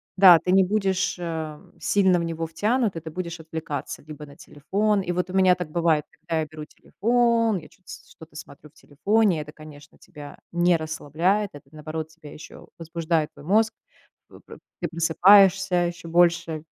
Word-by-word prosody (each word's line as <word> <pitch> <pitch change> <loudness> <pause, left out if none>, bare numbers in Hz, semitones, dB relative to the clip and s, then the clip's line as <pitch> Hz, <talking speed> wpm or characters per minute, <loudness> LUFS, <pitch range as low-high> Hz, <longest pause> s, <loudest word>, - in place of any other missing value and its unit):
да, 185 -3 +8
ты 180 - -2
не 190 0 +5
будешь, 190 -2 -1
а, 160 -3 -5 0.2
сильно 190 -3 +2
в 170 - -2
него 165 0 -4
втянут, 210 +5 -1
и - - -4
ты 160 0 -9
будешь 170 0 -6
отвлекаться 160 -3 -6
либо 150 -1 -10
на 140 - -15
телефон 200 +9 -1
И 180 -2 -3
вот 180 +1 -2
у - - -9
меня 185 -1 +4
так 175 -4 -7
бывает, 165 -3 +1
когда 165 -1 -2
я - - -2
беру 155 0 -10
телефон, 230 +4 0
я 165 - -10
чё-то 185 -3 -28
с - - -12
что-то 160 -1 -16
смотрю 150 -1 -12
в 145 - -36
телефоне. 185 +3 0
Это, 150 - -10
конечно, 150 -2 -15
тебя 145 -2 -12
не 175 0 +2
расслабляет, 165 +6 -1
это, 145 - -12
наоборот, 155 +1 -6
тебя 160 -3 -14
ещё 155 - -13
возбуждает, 165 -1 -2
твой - - -15
мозг. 220 +5 +2 0.6
П - - -15
п - - -14 0.2
ты - - -1
просыпаешься 190 +3 +4
ещё 170 -1 -8
больше, 170 -2 +1
170 Hz, 180 wpm, -24 LUFS, 155-190 Hz, 0.6 s, да